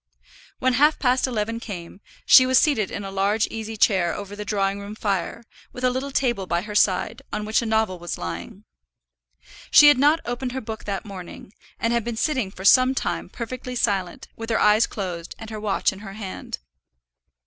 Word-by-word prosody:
When 255 0 +1
half 295 +5 +4
past 255 0 +2
eleven 230 -1 -2
came, 190 -4 -8 0.2
she 255 - +8
was 260 0 +4
seated 240 -10 +2
in 205 - -5
a 195 - -6
large 200 +3 +1
easy 220 0 -6
chair 185 -5 +2
over 205 0 -7
the 210 - -5
drawing 200 -1 -1
room 200 +1 -8
fire, 200 +1 -2 0.3
with 250 - -8
a 255 - +3
little 260 +2 -3
table 240 -8 0
by 175 0 0
her 210 0 -7
side, 205 +2 +1
on 210 - -3
which 215 +3 +1
a 230 - -3
novel 220 -5 0
was 175 -1 -5
lying. 85 - -7 1.1
She 295 - +9
had 275 -3 +4
not 295 +4 +4
opened 245 +1 -3
her 265 - -2
book 220 -1 -7
that 200 +1 -4
morning, 190 0 -10 0.3
and 230 +1 0
had 235 -1 +1
been 235 0 -4
sitting 255 -6 0
for 190 0 -10
some 255 +4 +6
time - - -3
perfectly 250 +1 -6
silent, 195 -7 -1
with 225 0 -7
her 225 - +1
eyes 210 +2 +4
closed, 180 -4 -6
and 225 0 -9
her 215 - -5
watch 210 -2 0
in 190 - -11
her 195 -2 -9
hand. 195 -3 -6
220 Hz, 200 wpm, -23 LUFS, 195-245 Hz, 1.1 s, She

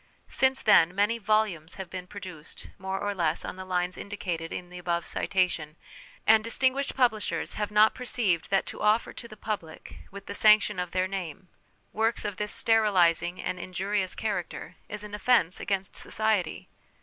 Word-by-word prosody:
Since 265 0 +2
then 180 -4 +5
many 210 +4 +1
volumes 205 -7 0
have 190 -1 -6
been 180 -1 -6
produced, 180 -6 -10
more 190 +1 -3
a 205 - 0
less 170 -5 0
on - - -5
the 185 - -7
lines 180 -1 -1
indicated 175 -5 -4
in 180 0 -6
the 180 - -8
above 170 -1 -1
citation, 175 -5 -1 0.5
and 220 0 +6
distinguished 260 +4 +1
publishers 240 -5 0
have 210 -1 -2
not 210 +1 +5
perceived 220 -9 0
that 195 -1 +2
to - - -8
offer 215 +2 +2
to 235 - -9
the 215 - -13
public, 200 -7 -6
with 200 0 -10
the - - -6
sanction 210 -2 +5
of 180 -1 -2
their 185 +1 0
name, 185 -2 -6 0.4
works 225 +1 0
of 205 -2 -3
this 210 0 -2
sterilising 185 -6 +3
and 180 - -3
injurious 185 +1 -2
character, 195 -6 -4
is 210 0 -4
an 210 -1 -9
offence 210 -4 +2
against 195 -1 -2
society. 215 -6 -1
195 Hz, 170 wpm, -27 LUFS, 180-215 Hz, 0.5 s, and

